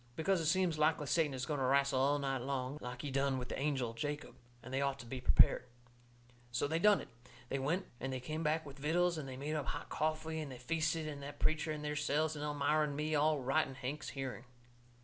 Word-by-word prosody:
Because 185 +2 +2
it 160 - 0
seems 175 -2 +2
likely 155 0 +3
Satan 150 -2 +2
is 125 -1 -3
going 145 0 -2
to 130 - +1
wrastle 140 0 +3
all 140 +2 +3
night 135 -2 -1
long, 135 +2 -2
like 125 0 -6
he 145 - -3
done 135 0 +1
with 125 -1 -5
the - - -3
angel 135 -5 0
Jacob, 145 +5 -4 0.3
and 125 - -8
they 135 - +1
ought 140 -1 0
to - - -11
be 125 +2 -5
prepared. 125 - +5 0.8
So 125 +4 0
they 160 +3 0
done 210 +2 +5
it. - - -9 0.4
They 135 - -1
went 165 +8 0
and 135 - -3
they 130 - -2
come 155 +5 -4
back 160 0 +1
with 140 -1 -10
vittles 170 +3 +2
and 135 -3 -6
they 130 - -6
made 145 +3 -3
up 150 -3 -2
hot - - -4
coffee 155 +1 -1
and 150 -3 -5
they 130 - -7
feasted 155 +2 -1
that 145 +1 -7
preacher 155 +1 +1
and 150 -1 -4
theirselves 150 +1 0
and 150 - -4
Elmira 150 +1 +2
and 145 - -4
me, 155 +1 -1
all 150 0 +3
right 135 +5 +2
in 135 - -9
Hank's 135 +3 -4
hearing. 135 -2 -5
145 Hz, 235 wpm, -35 LUFS, 135-155 Hz, 0.8 s, prepared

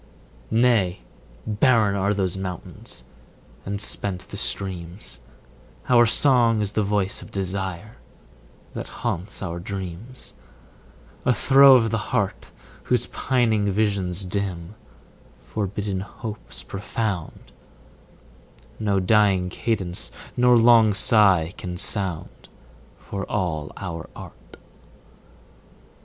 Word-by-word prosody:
Nay, 110 - +2 0.4
barren 110 -2 +3
are 100 +1 +1
those 95 -3 0
mountains 95 -2 -7 0.6
and 100 0 -3
spent 95 -4 -3
the - - -8
streams: 90 - -4 0.7
Our 120 -2 +6
song 120 -3 +4
is 105 -1 -1
the 110 - 0
voice 100 -1 -1
of - - -11
desire, 95 +1 -4 0.8
that - - -5
haunts 90 +4 -4
our 85 -2 -4
dreams, 95 +6 -7 0.9
A 125 - +3
throe 135 0 +7
of 115 -3 +3
the 115 - 0
heart, 100 -6 -1 0.4
Whose - - +2
pining 115 -6 +1
visions 100 -3 0
dim, 90 -2 -4 0.7
forbidden 100 -1 -3
hopes 105 +3 -7
profound, 100 -3 -4 1.3
10 - - -5
No 100 -1 +3
dying 95 -2 +3
cadence 95 -4 -2 0.3
nor 125 0 +5
long 115 -3 +6
sigh 95 -6 +4
can 90 -1 -5
sound, 95 -4 -2 0.5
For 100 -1 -6
all 80 -7 -2
our 85 -1 -6
art. - - -13
100 Hz, 105 wpm, -23 LUFS, 90-110 Hz, 1.3 s, throe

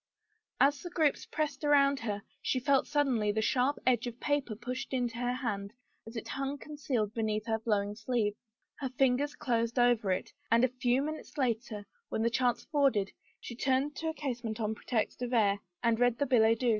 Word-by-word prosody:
As 280 0 +4
the 350 - -6
groups 305 -3 +1
pressed 300 -2 -2
around 280 -2 +4
her, 205 -3 -3 0.2
she 255 - 0
felt 275 +1 +2
suddenly 260 -8 +2
the 215 - -1
sharp 260 +5 +2
edge 245 -1 +2
of 240 0 -7
paper 285 -6 0
pushed 250 +4 -5
into 240 -2 -1
her 245 0 0
hand 210 -5 -3 0.3
as 225 - -9
it 225 - -5
hung 275 +1 -2
concealed 270 -8 -2
beneath 215 -1 -1
her 225 -1 0
flowing 205 -2 0
sleeve. 220 -1 0 0.5
Her 265 - -2
fingers 265 +3 +1
closed 235 -3 -1
over 240 -5 +3
it, 185 - -2 0.2
and 230 +2 +4
a 255 - +5
few 250 +1 +3
minutes 310 +1 -6
later, 230 -5 -1 0.2
when 220 - -1
the 235 - +2
chance 245 0 +1
afforded, 275 -10 +2 0.3
she 235 - -8
turned 265 +3 +1
to 320 - -2
a - - -2
casement 240 -6 -4
on 220 -1 0
pretext 220 +1 -2
of 245 0 -2
air, 205 -4 +3 0.2
and 230 -1 +2
read 245 -1 +3
the 285 - +1
billet 230 -3 +4
doux. 250 - +3
245 Hz, 195 wpm, -31 LUFS, 225-275 Hz, 0.5 s, a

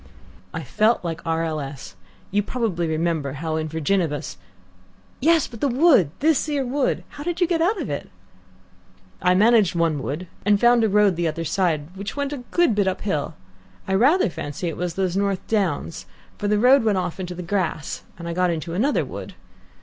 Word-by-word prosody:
"I - - -5
felt 215 -3 +1
like 165 -1 -3
R. 165 0 +1
L. 160 -2 -2
S. 135 -7 -8 0.4
You 205 +1 +2
probably 205 -7 -2
remember 160 -3 -1
how 155 +2 -3
in 155 0 -2
VIRGINIBUS 160 -1 -1 0.4
" - - -32
"Yes, 325 +1 +4
but 230 -3 -11
the 285 - +3
wood. 260 - +4
This 310 0 +2
'ere 285 -3 0
wood. 265 +2 0
How 290 - -9
did 345 +1 -3
you 355 - +4
get 335 -1 0
out 390 +5 +2
of 300 - -3
it?" 140 - -4 1.1
"I 180 0 +3
managed 215 -2 +4
one 165 -4 +1
wood, 145 +9 -4 0.2
and 205 0 +3
found 240 0 +5
a 220 - +3
road 200 -3 +3
the 170 -1 +1
other 165 +1 -3
side 165 -2 -1
which 200 +2 -6
went 285 0 -2
a - - -4
good 345 -9 +3
bit 205 -2 +1
uphill. 175 -5 -2 0.5
I 190 - -1
rather 265 - +4
fancy 145 +2 -5
it 165 - -5
was 175 -1 -3
those 185 -2 -1
North 200 -1 0
Downs, 185 -7 -1 0.3
for 205 - -1
the 210 0 +2
road 255 +4 +5
went 215 -3 +2
off 180 0 -3
into 180 -1 -5
grass, 175 -3 -2 0.2
and 170 0 -7
I 170 - -3
got 180 +1 +2
into 165 0 -3
another 250 +11 +1
wood. - - -8
190 Hz, 195 wpm, -23 LUFS, 165-235 Hz, 1.1 s, found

